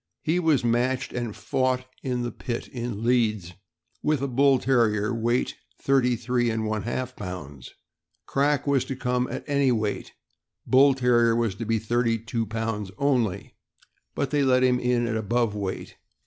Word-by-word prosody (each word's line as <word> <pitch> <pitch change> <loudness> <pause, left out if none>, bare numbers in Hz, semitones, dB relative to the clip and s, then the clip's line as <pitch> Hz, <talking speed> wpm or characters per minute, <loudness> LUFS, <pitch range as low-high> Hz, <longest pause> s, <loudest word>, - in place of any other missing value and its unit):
He 165 +3 +1
was 160 -7 +2
matched 125 +2 0
and 120 -3 -3
fought 130 -1 -1 0.2
in 125 -2 -2
the 120 - -3
pit, 120 -1 -5
in 120 -3 -5
Leeds, 110 -7 +1 0.5
with 150 -3 0
a - - 0
Bull 135 +1 +4
Terrier, 115 -4 +1
weight 120 +2 0 0.3
thirty 130 -3 +2
three 120 +1 0
and 110 -1 -1
one 110 -1 -1
half 130 +3 -4
pounds. 75 -10 -8 0.5
Crack 145 0 +1
was 140 -3 +2
to 135 - -4
come 125 0 -1 0.2
any 140 -2 +2
weight; 110 -3 -2 0.5
Bull 135 +1 +5
Terrier 120 -3 +3
was 115 -4 0
to 115 +4 -6
be 115 +1 +1
thirty 115 +1 0
two 115 0 -3
pounds 115 -2 -3
only, 120 -9 0 0.6
but 140 - -1
they 145 -1 +2
let 130 -2 +3
him 125 -1 +3
in 125 -1 +1
at 115 -1 -2
above 115 +1 0
weight. 100 -2 -5
120 Hz, 160 wpm, -25 LUFS, 110-130 Hz, 0.6 s, Bull